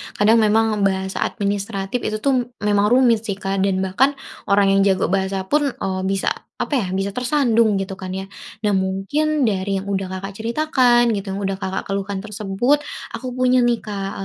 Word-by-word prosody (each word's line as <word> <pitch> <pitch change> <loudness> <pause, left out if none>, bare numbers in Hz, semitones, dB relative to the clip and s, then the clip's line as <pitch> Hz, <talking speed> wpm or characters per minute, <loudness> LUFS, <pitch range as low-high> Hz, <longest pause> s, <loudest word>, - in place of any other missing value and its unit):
Kadang 220 +3 +4
memang 220 0 +2
bahasa 190 -1 0
administratif 200 +2 -2
itu 215 -1 -2
tuh 255 -4 +2 0.2
memang 205 0 +3
rumit 235 -2 +3
sih 200 - -1
Kak, 195 0 -3
dan 190 -1 +1
bahkan 260 +10 +2 0.3
orang 200 0 +4
yang 195 0 +4
jago 190 -2 +1
bahasa 190 0 0
pun, 290 +8 +1
eee, 190 -7 -3
bisa 195 0 0 0.3
apa - - -3
ya? 220 -9 +1
Bisa 195 +2 -2
tersandung 240 -4 +2
gitu 195 0 -3
kan 190 0 -7
ya. 190 - -5 0.4
Nah 205 - +2
mungkin 200 +11 0
dari 195 -2 0
yang 190 - -5
udah 195 -1 -2
Kakak 190 +1 -5
ceritakan, 240 +2 +2
gitu 200 -1 -4
yang - - -4
udah 195 - 0
Kakak 190 -1 -3
keluhkan 195 0 -3
tersebut 215 +7 0 0.3
aku 255 - -5
punya 255 0 +3
nih 240 -1 +2
Kak, 195 -2 -4
200 Hz, 180 wpm, -21 LUFS, 195-240 Hz, 0.4 s, Kadang